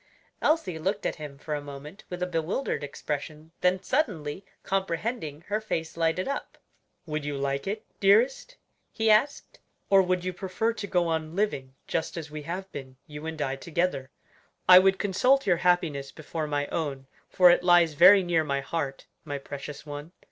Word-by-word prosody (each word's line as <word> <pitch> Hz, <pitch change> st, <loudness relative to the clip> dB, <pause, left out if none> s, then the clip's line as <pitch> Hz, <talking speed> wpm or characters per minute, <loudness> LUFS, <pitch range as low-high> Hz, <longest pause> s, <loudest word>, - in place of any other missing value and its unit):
Elsie 195 Hz, -, +1 dB
looked 195 Hz, +5 st, -2 dB
at -, -, -1 dB
him 150 Hz, -3 st, -8 dB
for 150 Hz, +2 st, -5 dB
a 145 Hz, -, -2 dB
moment 145 Hz, +6 st, -10 dB
with 180 Hz, 0 st, -4 dB
a -, -, +2 dB
bewildered 175 Hz, -, -2 dB
expression; 150 Hz, +2 st, -5 dB
then 185 Hz, +1 st, +2 dB
suddenly 190 Hz, -, -1 dB, 0.2 s
comprehending, 190 Hz, -, -2 dB
her 210 Hz, +5 st, -2 dB
face 165 Hz, -7 st, -3 dB
lighted 165 Hz, +2 st, 0 dB
up. 280 Hz, -, -4 dB, 0.5 s
"Would 155 Hz, -2 st, -3 dB
you 145 Hz, -1 st, -3 dB
like 140 Hz, +2 st, -2 dB
it, 215 Hz, +2 st, -3 dB
dearest?" 240 Hz, -, +3 dB, 0.3 s
he 220 Hz, 0 st, +2 dB
asked; 220 Hz, +7 st, +1 dB, 0.3 s
"or 195 Hz, -1 st, +7 dB
would 180 Hz, -1 st, 0 dB
you 185 Hz, -, -2 dB
prefer 190 Hz, +5 st, -1 dB
to 210 Hz, -3 st, -6 dB
go 175 Hz, -2 st, +1 dB
on 160 Hz, 0 st, -2 dB
living 135 Hz, -11 st, -1 dB
just 165 Hz, +1 st, -2 dB
as 160 Hz, -2 st, -6 dB
we 150 Hz, 0 st, -6 dB
have 185 Hz, +5 st, -6 dB
been, 130 Hz, -2 st, -9 dB
you 150 Hz, 0 st, -8 dB
and 160 Hz, -1 st, -5 dB
I 135 Hz, -, -2 dB
together? 150 Hz, -3 st, -2 dB, 0.6 s
I 180 Hz, 0 st, +11 dB
would 190 Hz, +1 st, +3 dB
consult 250 Hz, +8 st, +2 dB
your 180 Hz, -4 st, +3 dB
happiness 165 Hz, -6 st, +1 dB
before 155 Hz, 0 st, -5 dB
my 145 Hz, -1 st, -1 dB
own, 140 Hz, -5 st, -3 dB, 0.2 s
for 180 Hz, -1 st, +7 dB
it 175 Hz, -, +3 dB
lies 175 Hz, -3 st, +5 dB
very 185 Hz, +6 st, +8 dB
near 170 Hz, -2 st, +2 dB
my 140 Hz, -2 st, -1 dB
heart, 135 Hz, -2 st, -4 dB, 0.2 s
my 145 Hz, -2 st, -4 dB
precious 140 Hz, +1 st, -8 dB
one. 145 Hz, +3 st, -8 dB
165 Hz, 175 wpm, -27 LUFS, 150-190 Hz, 0.6 s, I